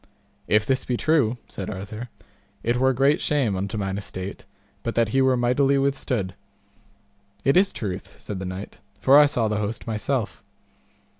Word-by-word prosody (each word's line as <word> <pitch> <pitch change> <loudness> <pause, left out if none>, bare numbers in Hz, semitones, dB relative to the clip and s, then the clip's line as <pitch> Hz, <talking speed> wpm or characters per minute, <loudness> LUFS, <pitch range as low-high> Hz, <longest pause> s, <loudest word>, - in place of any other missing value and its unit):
If 105 0 +3
this 135 +2 +1
be 125 - -1
true, 135 -7 +2
said 95 - -6
Arthur, 105 +4 -6 0.5
it 120 +1 +1
were 130 +1 +4
great 135 +4 +3
shame 135 -9 +1
unto 100 +3 -3
mine 95 -1 -2
estate 95 -1 -6 0.4
but 115 - -3
that 115 -2 +2
he 135 +5 +2
were 130 -1 +3
mightily 135 +3 +3
withstood. 135 -8 0 1.1
It 135 - +4
is 195 +2 +5
truth, 95 -4 -6
said 100 -3 -6
the 95 - -4
knight, 95 +2 -7 0.2
for 140 +2 +7
I 150 - +7
saw 120 -5 0
the 105 0 -1
host 105 +2 -3
myself. 115 +1 -2
115 Hz, 165 wpm, -24 LUFS, 100-135 Hz, 1.1 s, for